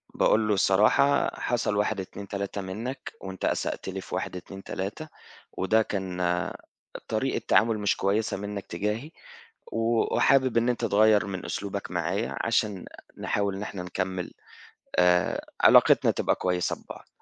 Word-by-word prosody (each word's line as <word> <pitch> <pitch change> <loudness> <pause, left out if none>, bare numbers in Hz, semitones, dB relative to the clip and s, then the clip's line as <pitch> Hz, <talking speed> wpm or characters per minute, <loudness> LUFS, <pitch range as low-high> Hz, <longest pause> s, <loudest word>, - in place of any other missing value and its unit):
باقول 110 0 +3
له 105 - +3
الصراحة 105 +9 +4
حصل 120 -3 0
1 105 0 0
2 100 +1 -9
3 100 0 -4
منّك، 115 +8 -5
وأنت 95 -1 -5
أسأت - - -2
لي - - -5
في - - -6
1 - - -3
2 95 +2 -9
3 100 +14 -5 0.5
وده 110 +4 +3
كان 95 -4 -3 0.9
طريقة 115 +5 -1
تعامل 110 0 +3
مش 100 -1 +1
كويسة 105 +2 0
منّك 100 0 -5
تجاهي، 105 - -3 0.6
و 115 0 +1
وحابب 130 -3 +3
إن 115 +1 +3
أنت 125 - 0
تغيّر 105 -1 +4
من 95 -2 -5
أسلوبك 100 0 -4
معايا 90 +5 -2
عشان 105 -5 0 0.3
نحاول 100 -1 -1
إن 100 - -5
إحنا 100 -3 -5
نكمّل 95 0 -3 0.7
آآ 90 0 +3 0.2
علاقتنا - - +6
تبقى - - +1
كويسة 90 -1 -1
ببعض، - - -12
100 Hz, 145 wpm, -27 LUFS, 95-110 Hz, 0.9 s, علاقتنا